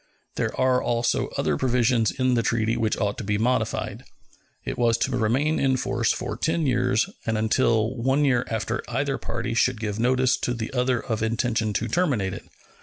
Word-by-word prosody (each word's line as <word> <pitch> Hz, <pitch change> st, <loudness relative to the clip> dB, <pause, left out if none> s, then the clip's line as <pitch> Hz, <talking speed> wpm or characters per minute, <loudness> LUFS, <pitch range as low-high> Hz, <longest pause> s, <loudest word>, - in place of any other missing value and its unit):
There -, -, -2 dB
are 130 Hz, 0 st, +3 dB
also 120 Hz, 0 st, 0 dB
other 75 Hz, -2 st, 0 dB
provisions 120 Hz, -3 st, +2 dB
in 130 Hz, -1 st, 0 dB
the 120 Hz, -, +2 dB
treaty 115 Hz, -1 st, 0 dB
which 110 Hz, -1 st, 0 dB
ought 100 Hz, -2 st, -1 dB
to -, -, -4 dB
be 105 Hz, 0 st, 0 dB
modified. 125 Hz, +4 st, -1 dB, 0.6 s
It -, -, -3 dB
was 115 Hz, -1 st, +2 dB
to 130 Hz, +2 st, -1 dB
remain 130 Hz, +7 st, +1 dB
in 135 Hz, -1 st, +2 dB
force 120 Hz, -2 st, 0 dB
for -, -, -3 dB
ten 160 Hz, 0 st, 0 dB
years 125 Hz, -, +2 dB, 0.2 s
and 110 Hz, -1 st, +1 dB
until 110 Hz, +1 st, +1 dB
one 135 Hz, +4 st, +1 dB
year 125 Hz, -3 st, +2 dB
after 110 Hz, +1 st, -2 dB
either 135 Hz, +3 st, -1 dB
party 115 Hz, 0 st, -3 dB
should 115 Hz, 0 st, +1 dB
give 105 Hz, -1 st, -3 dB
notice 130 Hz, +1 st, +2 dB
to 125 Hz, -, -2 dB
the 115 Hz, +2 st, -5 dB
other 125 Hz, -1 st, +1 dB
of 110 Hz, -2 st, -3 dB
intention 110 Hz, -1 st, 0 dB
to 115 Hz, -, -1 dB
terminate 120 Hz, -, 0 dB
it. -, -, -8 dB
120 Hz, 185 wpm, -24 LUFS, 110-130 Hz, 0.6 s, are